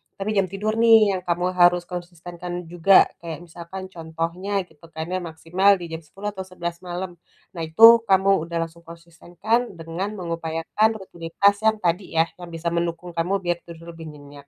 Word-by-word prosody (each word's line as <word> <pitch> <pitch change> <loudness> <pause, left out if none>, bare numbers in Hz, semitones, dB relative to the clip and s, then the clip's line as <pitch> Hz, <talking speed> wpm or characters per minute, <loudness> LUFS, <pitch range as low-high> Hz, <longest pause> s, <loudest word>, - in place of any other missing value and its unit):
Tapi 195 +2 -4
jam 195 -3 +1
tidur 210 +4 -2
nih, 225 -3 +6
yang 185 - -4
kamu 175 +1 0
harus 175 0 +5
konsistenkan 175 0 -8 0.2
juga. 175 +2 +6 0.2
Kayak 165 -3 -7
misalkan, 175 +3 -9
contohnya, 170 +4 -3
gitu 165 -1 -19
kan, 160 +1 -7
ya, 185 - 0
maksimal 175 +4 +2
di 175 -3 -8
jam 160 - -4
10.00 195 +6 -7
atau 190 -2 -8
11.00 170 -2 -5
malam. 180 -1 -6 0.3
Nah, 170 - -7
itu, 160 +8 0 0.2
kamu 195 -3 +3
udah 170 -1 -1
langsung 165 0 -10
konsistenkan, 175 +7 -3
dengan 170 +5 -5
mengupayakan 170 +4 -1
rutinitas 190 0 0
yang 220 -2 +1
tadi, 175 +1 -1
ya, 165 +1 +2
yang 175 - -8
bisa 170 0 -4
mendukung 170 +1 -2
kamu, 180 +4 -1
biar 175 -1 -1
tidur 170 0 -10
lebih 165 -1 -10
nyenyak. 145 -1 -13
175 Hz, 175 wpm, -23 LUFS, 165-190 Hz, 0.3 s, nih